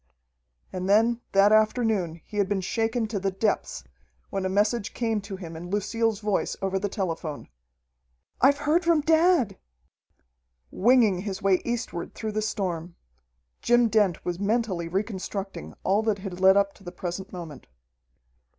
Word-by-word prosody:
And 185 +1 -3
then 230 +3 +3
that 195 +1 +5
afternoon 215 -6 +2
he 210 - -8
had 200 -2 +1
been 205 -2 0
shaken 225 +4 -1
to 210 -3 -2
the 195 +1 0
depths 195 - -1 0.5
when 195 -1 -2
a - - 0
message 210 +3 0
came 225 -3 0
to 200 0 -7
him 170 -4 -8
in 175 +2 -8
Lucille's 210 +2 0
voice 205 -2 -1
over 195 0 -1
the 205 +1 -2
telephone: 165 -6 -4 0.9
"I've 280 +2 +5
heard 305 +4 +1
from 335 -2 +3
dad!" 320 - +3 1.1
Winging 225 -4 +4
his 195 0 -5
way 195 -2 +3
eastward 235 -8 -4
through 220 -1 -4
the 215 +1 -1
storm, 180 -6 -3 0.7
Jim 240 -1 +4
Dent 205 -5 +1
was 175 0 -2
mentally 205 -5 0
reconstructing 195 - -4
all 200 +3 +2
that 220 -2 0
had 190 -2 -7
led 190 +1 +6
up 200 0 +2
to - - -20
the 175 - -7
present 180 +2 -5
moment. 165 -7 -9
200 Hz, 155 wpm, -26 LUFS, 185-225 Hz, 1.1 s, led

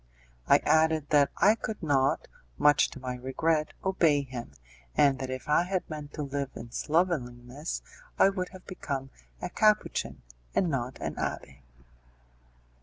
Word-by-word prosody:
I - - +7
added 155 -1 +3
that 145 -2 +5
I 210 - +6
could 220 -3 -5
not, 135 -3 +2 0.3
much 145 - +5
to - - -10
my 125 -1 -4
regret, 155 +5 0
obey 165 -7 +3
him, 120 - -8 0.4
and 135 -2 +4
that 130 -1 -4
if 130 0 -5
I 150 +2 +4
had 185 +1 -2
meant 150 -1 -6
to 150 - -3
live 140 -1 -3
in 115 0 -8
slovenliness, 145 -3 -1 0.3
I - - +6
would 185 -2 -3
have 185 -1 -13
become 135 -7 -5 0.3
a 180 - -2
Capuchin 215 0 +1 0.3
and 175 -4 +2
not 130 -2 -2
an - - -4
abbé. - - -4
150 Hz, 150 wpm, -29 LUFS, 130-170 Hz, 0.4 s, I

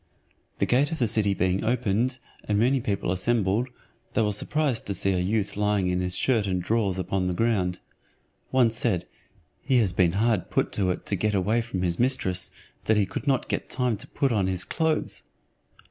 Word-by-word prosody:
The - - +1
gate 140 +5 +2
of 165 - -2
the 120 - +1
city 105 -2 +2
being 95 +1 0
opened, 120 +1 0 0.3
and 105 - 0
many 125 +5 +3
people 100 -6 -1
assembled, 105 +3 +1 0.5
they 115 - +3
were 105 - +1
surprised 135 +4 0
to 100 - -1
see 100 +2 +1
a 90 - +1
youth 100 +3 0
lying 105 -2 +1
in 90 0 0
his 90 0 -1
shirt 115 -6 +2
and 90 -1 0
drawers 100 0 0
upon 95 0 -1
the 90 - -1
ground. 95 -5 +1 0.7
One 125 -3 +3
said, 110 -6 0 0.6
"He 135 -3 +2
has 105 -6 +2
been 90 -2 +3
hard 110 -1 +1
put - - 0
to 95 -3 0
it 90 - -3
to 100 - -1
get 105 +2 0
away 105 +5 +2
from 100 -6 -4
his 85 -1 -1
mistress, 120 -8 +1 0.4
that 110 - +3
he 105 - +3
could 120 - -6
not 135 -3 +1
get - - -3
time 125 -3 0
to 110 - -6
put 140 -3 0
on 100 -5 +1
his 95 -1 -1
clothes." 160 -1 -1
105 Hz, 200 wpm, -26 LUFS, 95-120 Hz, 0.7 s, many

